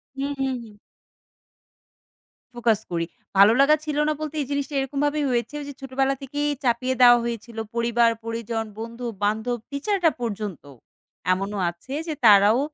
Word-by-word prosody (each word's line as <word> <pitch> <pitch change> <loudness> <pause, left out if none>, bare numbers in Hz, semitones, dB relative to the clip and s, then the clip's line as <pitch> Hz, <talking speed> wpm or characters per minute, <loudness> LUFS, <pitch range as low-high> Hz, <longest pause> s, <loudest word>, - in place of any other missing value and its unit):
হু, 270 - -3 0.2
হু, 270 - +1 0.2
হু। - - -11 1.9
Focus 230 -3 +2
করি 165 -1 -1 0.3
ভালো 200 +3 +8
লাগা 295 +2 +6
ছিল 300 -1 -2
না 305 - +2
বলতে, 310 0 -4
এই 275 - -4
জিনিসটা 280 0 -2
এরকম 270 +1 -3
ভাবেই 290 0 0
হয়েছে 240 +3 -1
ওই 290 - -6
যে - - -7
ছোটবেলা 270 +1 0
থেকেই 290 +2 -2
চাপিয়ে 255 +1 +1
দেওয়া 240 -1 +9
হয়েছিল 235 -1 -5 0.2
পরিবার, 235 0 +3
পরিজন, 230 0 -3
বন্ধু-বান্ধব 230 0 -2
টিচাররা 340 +4 +1
পর্যন্ত। 210 - -4 0.7
এমনও 195 +2 -3
আছে 175 +11 -10
যে 315 - -1
তারাও 210 +3 +7
240 Hz, 145 wpm, -24 LUFS, 220-275 Hz, 1.9 s, দেওয়া